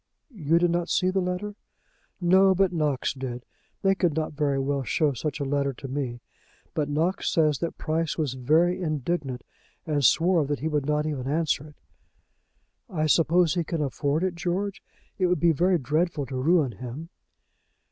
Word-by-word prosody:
"You 165 -5 +1
did 175 0 +3
not 175 0 -1
see 185 0 +2
the 190 - +1
letter?" 180 +3 -3 0.7
"No; 190 +2 +5
but 190 -1 +2
Knox 150 -5 0
did. 125 -2 -6 0.4
They 195 0 +4
could 175 -5 0
not 155 -1 -2
very 145 -2 0
well 135 +1 0
show 145 +2 +1
such 145 +4 -4
a - - -1
letter 140 0 0
to 135 - -8
me; 130 -3 -4 0.5
but 150 -2 -1
Knox 165 +6 0
says 155 -4 +2
that 170 - -3
Price 160 0 -1
was 150 -6 -1
very 160 +8 +2
indignant, 150 -4 -2 0.4
and 150 -3 0
swore 165 +6 +4
that 145 0 -1
he 155 - -2
would 150 -3 -1
not 150 0 +1
even 140 -4 -3
answer 150 0 0
it." 150 - -16 1.1
"I 155 -6 -1
suppose 165 +2 +3
he 175 -2 0
can 165 -1 -2
afford 145 +3 -1
it, 185 -1 0
George? 180 +3 -2 0.4
It 185 - +3
would 180 0 +1
be 170 -1 +4
very 175 +4 +2
dreadful 155 +2 -1
to 130 - -7
ruin 145 +1 +2
him." 125 - -8
155 Hz, 180 wpm, -26 LUFS, 140-175 Hz, 1.1 s, No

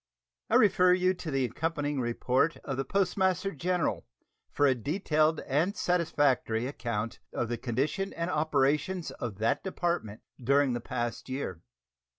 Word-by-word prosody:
I - - +3
refer 185 -3 +5
you 185 0 +3
to 175 -3 -7
the 135 -3 +1
accompanying 145 +2 -2
report 125 +6 +1
of 135 - -3
the 135 - 0
Postmaster 190 +3 +1
General 175 +3 -1 0.4
for 145 - +2
a 135 - +5
detailed 155 - +1
and 160 +9 0
satisfactory 145 -9 +1
account 115 -4 -3
of 120 - -2
the 120 - -1
condition 140 - -1
and 170 +2 -2
operations 150 +3 +1
of 110 -6 -6
that 110 +2 0
Department 170 - -2 0.2
during 140 +1 +3
the 120 - -3
past 120 +1 -4
year. 130 - -4
145 Hz, 145 wpm, -29 LUFS, 125-175 Hz, 0.4 s, refer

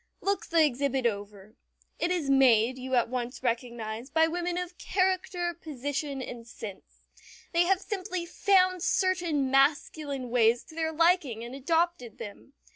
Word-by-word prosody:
Look 400 0 -1
the 330 -2 +4
exhibit 270 -1 -1
over. 205 -1 -3 0.5
It 345 - +1
is 350 -5 -1
made, 260 -2 +4
you 260 0 -2
at 240 - +3
once 250 +1 -4
recognize, 235 -1 -3
by 320 +3 +4
women 350 +1 -2
of 360 0 -5
character, 370 -2 0
position, 285 -3 -4
and 235 -2 -8
sense. 210 -3 -10 0.5
They 340 +1 +4
have 380 +1 +3
simply 370 -4 -4
found 370 0 +3
certain 345 -8 +1
masculine 275 -1 +1
ways 235 -1 +3
to - - -16
their 320 -1 -1
liking 320 -8 +2
and 240 +2 -8
adopted 320 -3 -1
them. 210 +6 -10
285 Hz, 145 wpm, -28 LUFS, 245-345 Hz, 0.5 s, the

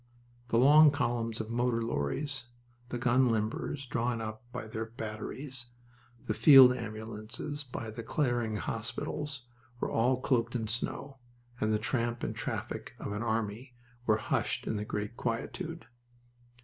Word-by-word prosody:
The 115 - +2
long 150 +5 +8
columns 120 -5 -1
of 110 0 -4
motor 120 -1 +1
lorries, 120 - -2 0.4
the 120 - -2
gun 125 +1 +4
limbers 115 +5 -1
drawn 120 -1 0
up 110 0 -5
by 125 -2 -5
their 110 +1 -3
batteries, 120 +4 -6 0.6
the 110 - 0
field 125 +3 +9
ambulances 115 +5 -5
by 120 -4 -6
the 115 +2 -6
clearing 120 -3 0
hospitals, 130 +6 -3 0.4
were - - -1
all 125 +3 +3
cloaked 120 -3 +1
in 115 -2 0
snow, 135 +4 -3 0.4
and 110 - +1
the 105 - +3
tramp 120 +1 -1
and - - -2
traffic - - -4
of - - -5
an 105 +2 -3
army 115 +2 -2 0.3
were 110 -1 +5
hushed 110 - -1
in - - -1
the 105 0 -2
great 105 +2 -3
quietude. 160 +8 -3
115 Hz, 145 wpm, -31 LUFS, 110-130 Hz, 0.6 s, field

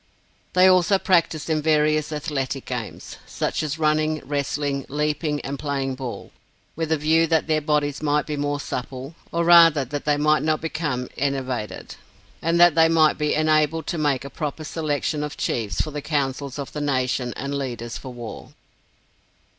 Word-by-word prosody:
They 185 0 +6
also 185 +1 +5
practised 170 -5 +1
in 155 -2 +1
various 155 0 +2
athletic 140 -3 -3
games, 120 -4 -6
such - - -2
as 155 0 -3
running, 155 0 +1
wrestling, 140 0 -2
leaping, 150 +1 -1
and 140 0 -5
playing 140 -2 -2
ball, 130 -2 -7 0.4
with 160 0 -3
a 160 - +3
view 160 +2 +3
that 160 -1 +2
their 155 -1 +1
bodies 145 -1 0
might 150 -1 +1
be 150 - -3
more 145 0 -1
supple, 130 +2 -5 0.2
or 170 0 0
rather 165 -4 +7
that 145 +3 -5
they 150 -1 +2
might 150 +1 +3
not 155 0 +1
become 150 -6 -3
enervated, 130 -5 -3 0.4
and 165 +1 +1
that 175 -2 +7
they 165 0 +5
might 160 -2 +4
be 150 0 +1
enabled 155 0 +2
to 170 - -3
make 140 -3 0
a 140 - -8
proper 155 -1 -4
selection 150 -1 -2
of 150 0 -5
Chiefs 110 -4 -2
for 155 - -4
the 150 0 -4
councils 140 -2 -2
of 140 -2 -6
the 150 - -4
nation 130 -3 0
and 140 +2 -4
leaders 120 -4 -4
for 130 - -8
war. 120 -2 -9
150 Hz, 170 wpm, -23 LUFS, 140-155 Hz, 0.4 s, rather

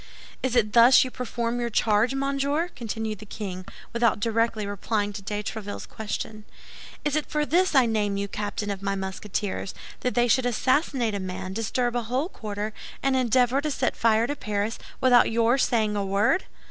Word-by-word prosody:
"Is 260 -2 -1
it 215 -3 +2
thus 240 +2 +8
you 255 - -5
perform 240 -1 -3
your 240 0 -1
charge, 220 +3 +2
monsieur?" 280 +4 0
continued 220 -2 -4
the 215 - -10
king, 185 -3 -6 0.3
without 235 -2 +2
directly 225 0 0
replying 205 +1 -2
to 200 - -6
de 210 +1 -3
Tréville's 205 -1 -5
question. 215 0 -5 0.6
"Is 295 -1 +1
it 305 - 0
for 300 -1 0
this 355 +2 +2
I 260 -2 +6
name 210 -3 0
you 200 0 -2
captain 205 0 -3
of 195 -1 -5
my 195 0 -1
Musketeers, 190 0 -4 0.2
that 250 - -2
they 240 0 +3
should 245 +2 +3
assassinate 255 -1 +1
a 200 - -2
man, 185 0 -5
disturb 240 +3 -1
a 240 - +1
whole 255 +8 -1
quarter, 210 - -5 0.3
and 270 -1 +2
endeavor 255 +1 +3
to 305 - -1
set 265 -3 0
fire 225 0 +3
to 290 - -2
Paris, 210 -3 -2 0.2
without 250 -2 +6
your 230 +3 +2
saying 220 -5 +2
a 200 - 0
word? 200 - +2
225 Hz, 185 wpm, -26 LUFS, 205-255 Hz, 0.6 s, thus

